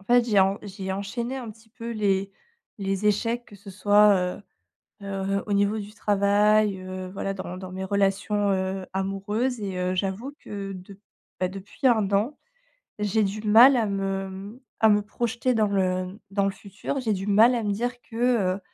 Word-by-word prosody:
en - - -19
fait 240 +2 +4
j'ai 205 -3 +5
en 195 +2 +2
j'ai 190 -2 -5
enchaîné 235 +6 -3
un 245 -4 -6
petit 225 +1 -18
peu 230 +1 -8
les 195 -2 0 0.5
les 195 +1 -1
échecs, 230 +3 +1
que - - -16
ce 200 0 -12
soit, 205 +1 +5
heu 180 +2 -2 0.6
heu, 195 0 -2
au 205 - -2
niveau 200 +2 +2
du 210 0 -7
travail, 205 0 +3
heu, 185 0 -6
voilà 195 0 -3
dans 180 -1 -6
dans 185 0 -8
mes 190 +1 -5
relations, 200 +1 +1
heu, 190 0 -2
amoureuses 200 +6 -1
et 195 -2 -4
heu, 180 0 0
j'avoue 195 +8 -2
que 200 -1 -6
de 190 +1 -11 0.4
bah, 185 - +1
depuis 195 +7 -8
1 220 -6 +4
an, 210 +9 +1 0.7
j'ai 210 +1 +2
du 200 +2 -3
mal 240 +6 +8
à 225 - +1
me, 195 -1 -2
mmh, 200 +6 -9 0.2
à 220 - +6
me 210 0 +4
projeter 235 +3 -1
dans 220 -1 +3
le 185 -1 -1
dans 200 0 +1
le 195 - +2
futur. 205 +7 -5
J'ai 220 -4 0
du 195 +1 -4
mal 220 +5 +5
à 230 - -2
me 205 - 0
dire 245 +3 -3
que, 230 - -17 0.4
heu, 200 - -7
200 Hz, 190 wpm, -25 LUFS, 195-220 Hz, 0.7 s, mal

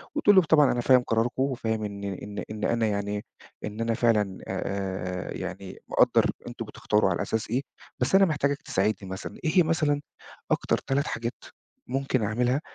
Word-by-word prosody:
وتقول 205 -9 +5
له 190 - +9
طبعًا 150 -3 +5
أنا 120 - 0
فاهم 130 +1 +5
قراركُم، 120 +3 +1
وفاهم 110 -5 -1
إن 100 -1 -5
إن 100 +1 -5
إن 110 -1 -6
أنا 115 -2 +2
يعني، 105 0 -2 0.4
إن 105 +2 -5
أنا 115 0 +1
فعلًا 105 -5 +2
آآ 95 -1 -3
يعني 95 +1 -6
مقدّر - - +4 0.2
أنتم 120 -1 -6
بتختاروا 105 -2 +1
على 85 - -1
أساس 110 -1 -2
إيه، 125 +4 +1 0.4
بس 125 +9 +2
أنا 195 0 +7
محتاجك 145 -3 0
تساعدني 95 -1 -1
مثلًا. 95 - -6
إيه 175 +3 +4
مثلًا 155 -3 +1 0.5
أكتر - - +2
3 140 +2 -1
حاجات 115 +1 -3 0.5
ممكن 130 -2 0
أعملها 125 +7 +1
115 Hz, 165 wpm, -27 LUFS, 100-135 Hz, 0.5 s, له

